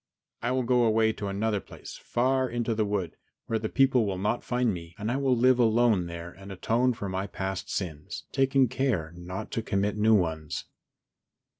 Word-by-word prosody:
I 120 - -1
will 130 0 +1
go 125 0 +3
away 110 -1 +3
to 105 -2 -5
another 100 +2 0
place - - -11
far 130 +1 0
into 120 -1 -1
the 110 0 +1
wood, 100 -5 -2 0.3
where 115 - -1
the 110 0 -3
people 130 -3 +4
will 95 -2 -2
not 105 +5 -1
find 125 -3 +1
me, 85 -1 -8
and 105 +3 -2
I 130 - 0
will 135 -3 +2
live 125 +1 +4
alone 115 -5 +3
there 85 0 -7
and 95 +2 -11
atone 120 +6 +1
for 100 -3 -5
my 95 +1 -2
past 95 -1 -4
sins, 80 -6 -4
taking 135 -1 +3
care 110 -11 -1
not 90 +2 -6
to 115 - -1
commit 100 0 -1
new 110 +1 +5
ones." 80 -5 -1
110 Hz, 190 wpm, -28 LUFS, 95-120 Hz, 0.3 s, new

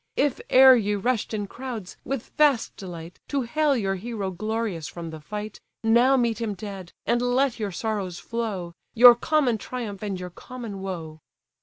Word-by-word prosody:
If 285 -3 +1
e'er 260 0 +9
ye 210 -3 +1
rush'd 230 +2 -1
in 210 -2 -2
crowds, 235 -3 -7
with 270 -3 -4
vast 290 -6 +3
delight, 175 -2 -9
To 280 -2 -1
hail 290 +3 +1
your 195 -4 0
hero 205 -2 -4
glorious 215 -3 -3
from 170 -2 -7
the 160 - -8
fight, 210 +7 -6 0.2
Now 240 +4 +5
meet 235 -2 0
him 215 -3 -2
dead, 195 -2 -8
and 240 - +2
let 245 0 +1
your 210 -2 -2
sorrows 195 -2 -3
flow; 205 -8 -4 0.2
Your 240 +1 +10
common 245 -2 +1
triumph, 220 -6 -6
and 200 -3 -3
your 180 0 -6
common 230 -1 -8
woe." 165 -5 -6
220 Hz, 170 wpm, -25 LUFS, 190-245 Hz, 0.2 s, Your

